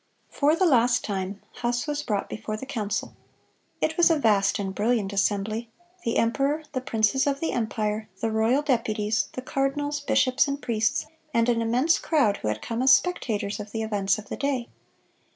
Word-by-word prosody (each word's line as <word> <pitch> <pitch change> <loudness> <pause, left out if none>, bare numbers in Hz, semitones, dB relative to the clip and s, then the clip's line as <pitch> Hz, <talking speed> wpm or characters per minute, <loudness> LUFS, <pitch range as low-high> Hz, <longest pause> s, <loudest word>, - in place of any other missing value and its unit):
(139) - - -16
For 300 +3 +3
the 335 - +4
last 240 -1 +3
time, 195 0 -4 0.2
Huss 240 0 0
was 295 -1 -2
brought 210 -8 -2
before 215 0 -5
the 265 - -7
council. 215 -6 -3 0.7
It 315 0 0
was 345 0 +6
a 325 - +3
vast 205 -6 +3
and 195 -2 -3
brilliant 210 -1 0
assembly,—the 225 - -2
emperor, 275 +6 +1
the 255 - -2
princes 235 +2 +1
of 280 -1 0
the 325 - -1
empire, 215 -1 -2
the 225 +1 -1
royal 225 +6 +2
deputies, 220 -5 0
the 255 - -6
cardinals, 285 +2 -1
bishops, 275 -1 +2
and 280 0 -2
priests, 225 -1 0 0.3
and 230 +1 +3
an 230 -1 +2
immense 250 +8 +2
crowd 255 -11 +2
who - - -5
had 105 0 -2
come 230 +1 -3
as 265 +1 +5
spectators 215 - +1
of 205 0 -8
the 225 -1 -2
events 205 -2 +1
of 215 -1 -10
the - - -4
day. 270 -4 -1
230 Hz, 185 wpm, -26 LUFS, 215-275 Hz, 0.7 s, was